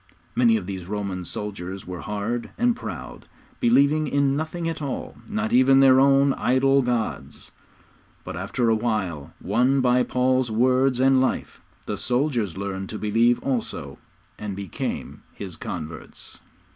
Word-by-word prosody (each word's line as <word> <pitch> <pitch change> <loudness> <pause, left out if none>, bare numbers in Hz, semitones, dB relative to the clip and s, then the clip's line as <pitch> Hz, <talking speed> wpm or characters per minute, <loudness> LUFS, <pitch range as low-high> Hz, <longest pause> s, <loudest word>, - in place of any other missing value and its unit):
Many 115 -2 +4
of 100 - -5
these 95 -2 -6
Roman 100 -3 -3
soldiers 95 -2 -6
were 90 -1 -6
hard 110 +3 -3
and 240 0 +2
proud, 255 - -8 0.3
believing 155 - +3
in 140 -1 +2
nothing 160 +3 -3
at 165 -1 -3
all, 140 -3 -4
not 220 +1 -2
even 130 +2 +5
in 135 - +7
their 130 -1 +7
own 140 0 +5
idol 135 +2 +3
gods; 120 -3 -3 0.7
but - - -6
after 120 -2 -1
a 115 - +4
while, 95 -10 -2
won 125 +7 +2
by 125 -1 +3
Paul's 130 0 +1
words 130 +3 +2
and 135 0 +4
life, 130 - -2 0.2
the - - -3
soldiers 120 - 0
learned 95 -1 -4
to 110 - -5
believe 115 +3 +3
also, 130 -4 -3 0.4
and 105 -2 -4
became 100 -4 -5
his 95 -4 -7
converts. 80 -3 -7
120 Hz, 145 wpm, -24 LUFS, 100-135 Hz, 0.7 s, in